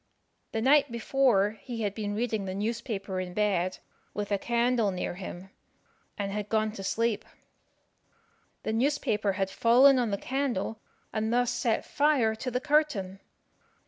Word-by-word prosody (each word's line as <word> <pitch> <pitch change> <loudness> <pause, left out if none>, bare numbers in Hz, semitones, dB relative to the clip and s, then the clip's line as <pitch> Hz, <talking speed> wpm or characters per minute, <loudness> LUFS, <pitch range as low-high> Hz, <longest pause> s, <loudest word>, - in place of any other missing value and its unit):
The 225 - -2
night 285 0 +4
before 230 -4 +2
he 235 -3 -5
had 205 -2 -1
been 205 -1 -3
reading 220 -3 -1
the 185 0 -4
newspaper 205 -2 -3
in 180 -1 -5
bed, 185 -4 +1 0.4
with 205 0 -3
a 200 - +1
candle 235 -1 +1
near 185 -2 -3
him, 180 +1 -8 0.7
and 200 -2 -2
had 210 0 -4
gone 215 -1 +1
to 200 -2 -8
sleep. 225 +1 0 1.4
The 220 - -2
newspaper 225 -5 +1
had 190 0 -1
fallen 255 +5 +6
on 240 -3 +1
the 200 - -1
candle, 245 -4 -2 0.3
and 220 0 -1
thus 245 0 +2
set 245 -2 0
fire 280 -7 +2
to 235 +4 -4
the 250 0 -1
curtain. 275 -11 +1
220 Hz, 150 wpm, -28 LUFS, 200-245 Hz, 1.4 s, fallen